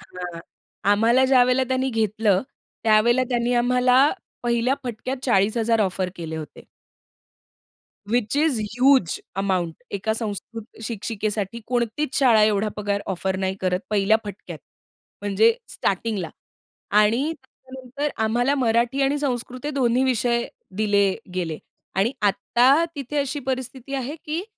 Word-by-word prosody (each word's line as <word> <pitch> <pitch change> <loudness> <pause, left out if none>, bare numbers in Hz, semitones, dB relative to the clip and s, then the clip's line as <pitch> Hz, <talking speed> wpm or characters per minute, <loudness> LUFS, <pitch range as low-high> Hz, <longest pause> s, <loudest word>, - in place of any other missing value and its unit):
हां. 180 -2 -8 0.5
आम्हाला 235 +5 +4
ज्यावेळेला 255 0 +4
त्यांनी 260 0 0
घेतलं 215 -3 +1 0.4
त्यावेळेला 230 +3 +4
त्यांनी 240 0 0
आम्हाला 250 +1 +3 0.4
पहिल्या 240 +2 +1
फटक्यात 250 +3 -4
40,000 225 0 +2
ऑफर 185 -2 0
केले 160 -2 -5
होते. 155 -1 -8 1.5
व्हिच 240 +2 0
इस 300 -6 +2 0.2
ह्यूज 255 - +3 0.2
अमाउंट 185 -2 -1 0.2
एका 220 +3 -1
संस्कृत 225 +1 -5
शिक्षिकेसाठी 215 0 -3
कोणतीच 245 +3 -1
शाळा 235 -6 +5
एवढा 210 0 +2
पगार 205 -1 -1
ऑफर 190 0 -2
नाही 190 0 -1
करत 185 0 0
पहिल्या 210 +1 +3
फटक्यात. 205 -1 -8 0.6
म्हणजे 450 - +3
स्टार्टिंगला 195 -3 -2 0.7
आणि 235 +9 +3
त्याच्यानंतर 260 +2 -6 0.2
आम्हाला 245 +5 +1
मराठी 240 +1 +1
आणि 280 +2 +1
संस्कृत 255 -2 -3
हे - - -1
दोन्ही 255 -2 +2
विषय 240 -1 +1 0.3
दिले 200 -2 +2 0.2
गेले. 165 -4 -2 0.4
आणि 200 +7 +1
आत्ता 250 +9 +3
तिथे 285 +1 -5
अशी 285 +1 -1
परिस्थिती 260 +1 -4
आहे 265 +2 -3
की 315 +3 -2
235 Hz, 120 wpm, -23 LUFS, 205-260 Hz, 1.5 s, शाळा